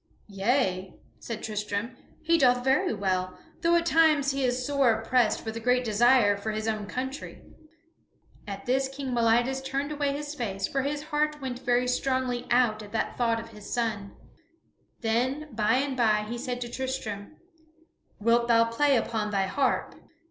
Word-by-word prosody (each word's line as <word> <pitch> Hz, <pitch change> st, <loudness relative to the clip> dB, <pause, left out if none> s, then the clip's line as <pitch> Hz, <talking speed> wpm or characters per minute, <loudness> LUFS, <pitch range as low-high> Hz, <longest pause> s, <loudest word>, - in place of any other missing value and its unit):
"Yea," 195 Hz, -2 st, 0 dB, 0.2 s
said 230 Hz, -2 st, -6 dB
Tristram, 210 Hz, +2 st, -3 dB, 0.3 s
"he 335 Hz, +1 st, +3 dB
doeth 250 Hz, -2 st, +4 dB
very 275 Hz, +8 st, +2 dB
well, 185 Hz, -1 st, -1 dB, 0.2 s
though 340 Hz, 0 st, +3 dB
at 340 Hz, 0 st, +2 dB
times 310 Hz, -4 st, +4 dB
he 275 Hz, 0 st, -2 dB
is 250 Hz, 0 st, 0 dB
sore 280 Hz, -4 st, +3 dB
oppressed 230 Hz, -1 st, +1 dB
with 220 Hz, 0 st, -4 dB
a -, -, -3 dB
great 250 Hz, +2 st, +2 dB
desire 225 Hz, -1 st, +4 dB
for 200 Hz, +2 st, -5 dB
his 215 Hz, 0 st, -3 dB
own 215 Hz, -2 st, -2 dB
country." 260 Hz, +6 st, -5 dB, 1.0 s
At 200 Hz, -1 st, -6 dB
this 265 Hz, +2 st, +1 dB
King 270 Hz, -1 st, -5 dB
Meliadus 240 Hz, +3 st, +2 dB
turned 275 Hz, +2 st, -2 dB
away 290 Hz, -1 st, 0 dB
his 290 Hz, +1 st, -5 dB
face, 195 Hz, -8 st, -3 dB
for 275 Hz, -, -1 dB
his 290 Hz, +2 st, -3 dB
heart 300 Hz, 0 st, -1 dB
went 255 Hz, -3 st, -5 dB
very 250 Hz, -1 st, +1 dB
strongly 250 Hz, -1 st, -1 dB
out 240 Hz, -3 st, +3 dB
at 205 Hz, -1 st, -11 dB
the 225 Hz, -, -1 dB
thought 230 Hz, -2 st, +1 dB
of 230 Hz, 0 st, -9 dB
his 210 Hz, -2 st, -11 dB
son. 220 Hz, -5 st, -2 dB, 0.8 s
Then 255 Hz, +6 st, -1 dB
by 215 Hz, +1 st, +2 dB
and 270 Hz, +1 st, 0 dB
by 215 Hz, -4 st, +2 dB
he 240 Hz, +2 st, -5 dB
said 250 Hz, -1 st, -4 dB
to 240 Hz, -, -3 dB
Tristram, 260 Hz, -2 st, -5 dB, 0.8 s
"Wilt 235 Hz, +2 st, +3 dB
thou 230 Hz, -1 st, +4 dB
play 280 Hz, +4 st, +3 dB
upon 225 Hz, -3 st, -1 dB
thy 195 Hz, -2 st, +1 dB
harp?" 265 Hz, +9 st, 0 dB
245 Hz, 170 wpm, -27 LUFS, 220-270 Hz, 1.0 s, doeth